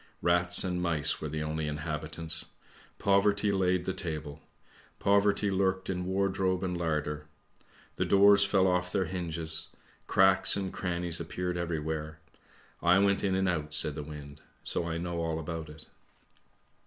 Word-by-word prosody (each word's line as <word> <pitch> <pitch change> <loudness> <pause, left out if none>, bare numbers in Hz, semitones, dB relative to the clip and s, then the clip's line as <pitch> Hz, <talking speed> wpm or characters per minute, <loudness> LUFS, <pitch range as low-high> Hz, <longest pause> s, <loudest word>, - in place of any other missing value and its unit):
Rats 90 0 +5
and 90 -1 -2
mice 85 -5 0
were 75 - -4
the 75 +1 -3
only 75 0 -3
inhabitants. 75 +2 -2 0.5
Poverty 100 +1 +2
laid 90 -2 +1
the 95 - -1
table; 80 -4 -5 0.6
poverty 100 0 +2
lurked 95 0 0
in 90 -1 -3
wardrobe 95 -1 0
and 90 -1 -2
larder. 75 -3 -2 0.7
The - - 0
doors 100 0 +6
fell 100 -2 +2
off 90 -1 +1
their 95 -1 0
hinges, 80 -2 -4 0.4
cracks 95 0 +4
and 95 -2 -4
crannies 85 -2 -1
appeared 90 +2 -3
everywhere, 80 -2 -3 0.6
I 90 +2 +4
went 100 0 +2
in 95 -2 +1
and 95 0 +1
out," 75 -4 0
said 75 0 +3
the 75 - -5
wind, 75 -1 -10
" - - -38
so 85 - -1
I 80 0 -2
know 85 0 -3
all 80 -1 -2
about 80 0 -5
it." 75 0 -12
85 Hz, 155 wpm, -29 LUFS, 80-95 Hz, 0.7 s, doors